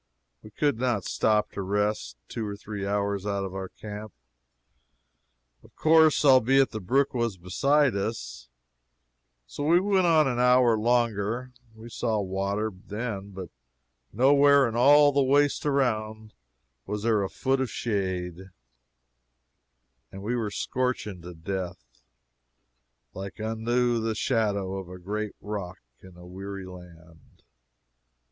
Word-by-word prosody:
We 105 - -12
could 140 +3 0
not 120 -6 0
stop 105 -1 +1
to - - -5
rest 105 - -1
two 115 - -5
or 100 -1 -5
three 100 -1 -6
hours 100 -1 -1
out 100 -1 -1
from 95 -1 -5
our 95 -1 -5
camp, 105 0 -9 1.5
of - - -21
course, 160 -1 +4
albeit 135 0 +5
the 110 - -4
brook 130 +8 +1
was 120 -5 -1
beside 135 +9 +2
us. 100 - -5 1.0
So 65 - -6
we 165 +4 +4
went 190 -2 +2
on 155 -3 +4
an 120 -2 -1
hour 125 -1 +5
longer. 115 +1 0 0.2
We 110 +1 -11
saw 115 -2 -1
water, 100 +2 -2
then, 100 +1 -6
but 95 -2 -8 0.6
nowhere 140 +2 +5
in 115 - -5
all 145 +4 +6
the 140 0 +2
waste 145 +2 +2
around 110 -6 -1 0.5
was 105 +1 -4
there 110 -3 +2
a 95 - -2
foot 135 0 0
of 130 - -1
shade, 95 -4 -3 1.6
and 95 +1 -9
we 120 +4 -1
were 115 -3 -2
scorching 115 -5 -3
to 90 0 -10
death. 80 -9 -6 1.1
"Like 95 +3 -8
unto 115 +2 0
the 110 0 -1
shadow 100 -5 0
of 95 -2 -9
a 90 - -9
great 105 +3 -4
rock 100 -4 -6 0.2
in 95 -1 -15
a 90 - -13
weary 95 +1 -7
land." 85 -3 -15
110 Hz, 135 wpm, -26 LUFS, 95-125 Hz, 1.6 s, all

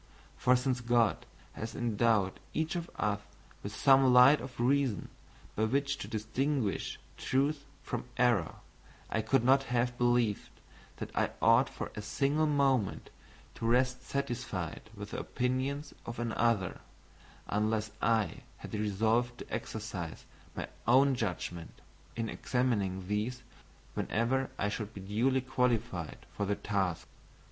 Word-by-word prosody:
For 125 - +4
since 125 0 0
God 120 -2 +2 0.3
has 110 +1 -6
endowed 110 -4 +1 0.2
each 160 +1 0
of 170 -1 -3
us 105 -1 0 0.4
with - - -6
some 135 -1 +6
light 125 +4 +8
of 125 -2 -9
reason 130 -4 +1 0.5
by 110 - +2
which 140 +4 +1
to - - -5
distinguish 115 +1 -1 0.2
truth 140 +2 0 0.2
from 125 - -4
error, 120 -9 +2 0.6
I 110 - +1
could 115 +3 +2
not 135 +2 +5
have 120 0 0
believed 120 -4 +2 0.5
that - - -6
I - - +2
ought - - +5
for - - -6
a 105 - -5
single 140 +8 +1
moment 135 -7 +1 0.4
to 115 - -3
rest 125 +1 +2
satisfied 120 - -4
with 105 0 -8
the - - -3
opinions 130 +4 -2
of 115 - -5
another, 115 -5 0 0.7
unless 110 +1 0
I 110 -2 +2 0.2
had - - -10
resolved 110 +4 +1
to - - -9
exercise 105 -7 -5 0.3
my - - -4 0.2
own 135 +3 +6
judgment 90 -7 -4 0.4
in 115 -1 -2
examining 100 -8 -1
these 110 +5 -2 0.5
whenever 130 +4 0
I 100 - 0
should 110 +1 -4
be 100 - -7
duly 120 +7 +1
qualified 120 -9 -1
for 100 - -1
the 100 - +1
task. 95 -6 -1
120 Hz, 135 wpm, -32 LUFS, 105-130 Hz, 0.7 s, light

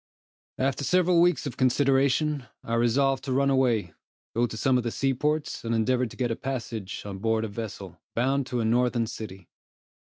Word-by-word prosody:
After 135 +1 0
several 180 +2 +3
weeks 175 -6 +3
of 140 - -5
consideration, 135 +1 +2 0.2
I 115 - -4
resolved 130 +3 +2
to 135 - -3
run 140 +1 +2
away, 120 -10 +1 0.4
go 120 +1 +2
to 110 - -7
some 130 +1 +3
of - - -3
the 120 - -1
seaports, 145 +5 -1
and 115 0 -1
endeavor 125 +3 +1
to - - -13
get 125 -2 0
a - - 0
passage 115 -7 -5
on 100 -2 -6
board 110 +1 +1
a - - -3
vessel, 110 +1 -7
bound 135 +3 +1
to 125 -3 -1
a - - 0
northern 120 +1 +2
city. 100 -5 -8
125 Hz, 185 wpm, -27 LUFS, 115-135 Hz, 0.4 s, several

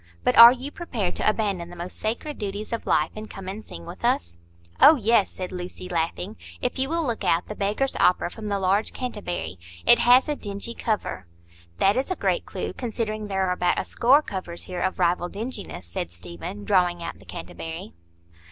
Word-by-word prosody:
But - - +2
are 235 +1 +12
you 260 +3 -5
prepared 230 - -3
to - - +3
abandon 200 -6 -1
the 175 - -10
most 175 +1 -7
sacred 240 +7 -3
duties 205 +2 -4
of 230 - -4
life, 155 +1 +2
and 215 0 -7
come 195 -1 -9
and 205 +3 -5
sing 85 0 -10
with - - -10
us?" 85 0 0 0.4
"Oh, 315 - +9
yes," 225 -4 +3
said 185 -1 -6
Lucy, 180 0 -6
laughing. 175 +4 -2 0.2
"If 250 - -2
you 265 +1 0
will 330 0 0
look 235 -4 -2
out 165 +2 +2
the - - -5
'Beggar's 210 +7 -1
Opera' 180 -1 +3
from 220 -2 -7
the 200 -1 0
large 195 +3 +1
canterbury. 175 - -4 0.3
It 240 - +7
has 245 +4 +6
a 300 - 0
dingy 205 0 -6
cover." 210 - -2 0.5
"That 200 +2 +4
is 265 +6 0
a 370 - 0
great - - 0
clue, - - -4
considering 215 -3 -3
there 190 -1 0
are - - +1
about 180 -1 +1
a - - -1
score 270 +5 +4
covers 185 - -5
here 180 -1 -5
of 185 - 0
rival 175 0 +1
dinginess," 210 - -5
said 85 0 -4
Stephen, 85 +3 -8
drawing 175 - +2
out 170 - -6
the - - -15
canterbury. 85 -1 -7
200 Hz, 200 wpm, -25 LUFS, 175-230 Hz, 0.5 s, are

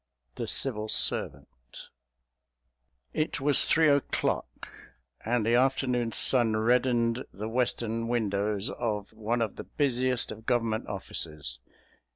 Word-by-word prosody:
THE - - -5
CIVIL 110 -5 0
SERVANT 60 -10 -1 1.2
It 155 - -2
was 140 0 +4
three 160 0 +3
o'clock, 145 -1 -1 0.5
and 115 -1 0
the 115 - +1
afternoon 125 -2 +1
sun 115 -2 +5
reddened 120 +1 +1
the 105 +3 -6
western 115 -1 -1
windows 105 -3 -1
of 105 -3 -4
one 115 +2 -1
of 110 - -5
the - - -6
busiest 130 -3 0
of 110 +1 -11
Government 115 -2 0
offices. 75 -9 -5
115 Hz, 115 wpm, -28 LUFS, 105-125 Hz, 1.2 s, sun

